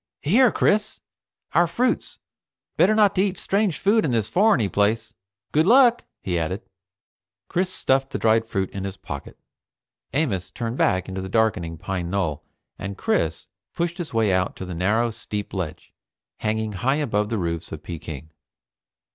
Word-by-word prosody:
"Here, 230 - +5
Chris. 210 +1 +1 0.5
Our 175 0 +4
fruits. 245 +10 0 0.6
Better 210 +5 +4
not 210 -2 +5
to 185 - +2
eat 195 -1 0
strange 200 -4 0
food 215 +3 +3
in 150 - 0
this 115 -3 0
foreigny 195 - +4
place. 105 +3 0 0.4
Good 155 +3 +3
luck," 245 0 +6 0.2
he 90 -2 0
added. 80 -1 -3 0.9
Chris 185 +1 0
stuffed 135 -5 +1
the - - -3
dried 110 0 +3
fruit 95 -4 -2
in 95 - -5
his 95 0 -5
pocket. 70 - -8 0.7
Amos 125 - -1
turned 120 +1 -4
back 95 -1 +2
into 95 0 -4
the 95 - -6
darkening 95 -7 +1
pine 90 0 -3
knoll, 85 -6 -1 0.4
and 100 +1 -5
Chris 80 0 0 0.3
pushed 170 +1 -2
his 175 - -4
way 110 -4 +2
out 95 0 0
to 95 - -6
the 90 - -6
narrow 110 +7 +1
steep 105 -1 -5
ledge, 90 -6 -5 0.4
hanging 110 0 -1
high 120 +8 0
above 105 -8 0
the 115 - -1
roofs 85 -3 -3
of 80 - -7
Peking. 80 -2 -7
110 Hz, 165 wpm, -24 LUFS, -, 0.9 s, luck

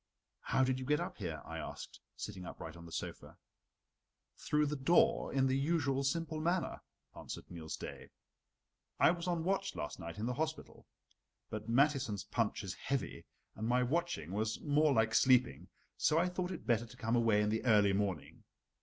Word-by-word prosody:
"How 130 - +1
did 130 0 +1
you 130 - -5
get 150 0 +3
up - - -4
here?" 80 -7 -4
I - - -6
asked, - - -7 0.2
sitting 100 -3 -6
upright 80 -2 -8
on 85 0 -11
the - - -12
sofa. - - -6 1.0
"Through 150 0 +1
the 150 +1 -1
door 145 +5 +3
in 135 -1 +2
the 130 0 +2
usual 140 -2 +1
simple 160 +3 -1
manner," 175 +2 0 0.3
answered - - -8
Niels 80 -3 -6
Daae. - - -8 0.9
"I - - +7
was 175 0 -4
on 170 -2 0
watch 195 +2 0
last 75 - -5
night 85 0 -7
in 105 - -2
the 125 - -1
hospital; 155 +3 -4 0.6
but 110 +1 -5
Mathiesen's 125 -6 +2
punch 115 0 -1
is 95 -2 -4
heavy 140 +5 -3 0.3
and 110 - -3
my 125 +1 +3
watching 125 - -1
was 110 +2 -1
more 150 0 +3
like 110 -3 +2
sleeping, 120 - +4 0.3
so 155 - +3
I 175 +2 +3
thought 180 0 -2
it 180 - -6
better 120 -1 +1
to - - -14
come 115 +2 0
away 115 -3 +4
in 105 - +1
the 110 +1 -1
early 105 -4 +5
morning. 95 -6 -2
125 Hz, 180 wpm, -35 LUFS, 105-150 Hz, 1.0 s, I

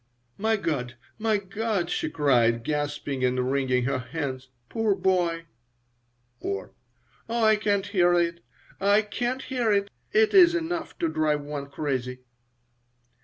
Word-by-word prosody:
"My 220 +2 +2
God! 135 - -2 0.2
My 220 -1 +2
God!" 200 -1 -2
she - - -1
cried, 120 -7 +2
gasping 145 -2 -2
and 125 0 +1
wringing 130 -2 +1
her 130 +1 0
hands. 130 0 -5 0.2
"Poor 220 - +1
boy!" 175 -3 0 0.9
or, 95 -1 -4 0.6
"Oh, 235 0 0
I 220 0 +6
can't 205 -2 0
hear 175 -4 +3
it! 170 -1 +1 0.4
I 200 +2 +4
can't 245 +5 -3
hear 245 -4 0
it! 200 0 +1 0.2
It 220 0 +3
is 350 -3 +7
enough 335 0 -3
to 165 - 0
drive 155 -2 0
one 145 -1 -6
crazy." 130 -3 -3
170 Hz, 135 wpm, -26 LUFS, 140-215 Hz, 0.9 s, is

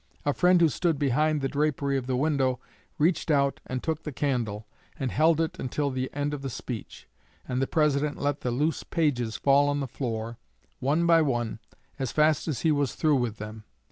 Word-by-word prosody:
A 145 - +2
friend 180 +2 +4
who 170 - +6
stood 165 +1 0
behind 150 +2 +1
the 135 - 0
drapery 140 -1 0
of 130 -2 -2
the 130 - 0
window 135 -2 +1 0.4
reached 165 +2 +1
out 140 -2 +2
and 130 0 -4
took 160 0 -2
the 150 - -5
candle, 120 -7 -2 0.3
and 130 -2 -1
held 160 +2 +3
it 165 -1 -1
until 140 +2 -1
the 130 0 -2
end 145 +1 -2
of 145 - -4
the 135 - -4
speech, 115 -2 -7 0.4
and 125 +1 -1
the 135 - +1
President 150 -1 +1
let 145 0 -1
the 125 - -1
loose 150 +7 0
pages 125 -9 0
fall 140 +1 +4
on 145 0 0
the 135 - -2
floor, 115 -2 -4 0.4
one 145 +6 +1
by 165 -1 +5
one, 120 -7 -1 0.4
as 130 -3 -2
fast 155 0 +2
as 145 -8 -2
he 160 - +3
was 145 -3 0
through 150 -3 +3
with 120 -4 -2
them. 110 +1 -8
140 Hz, 205 wpm, -27 LUFS, 125-150 Hz, 0.4 s, who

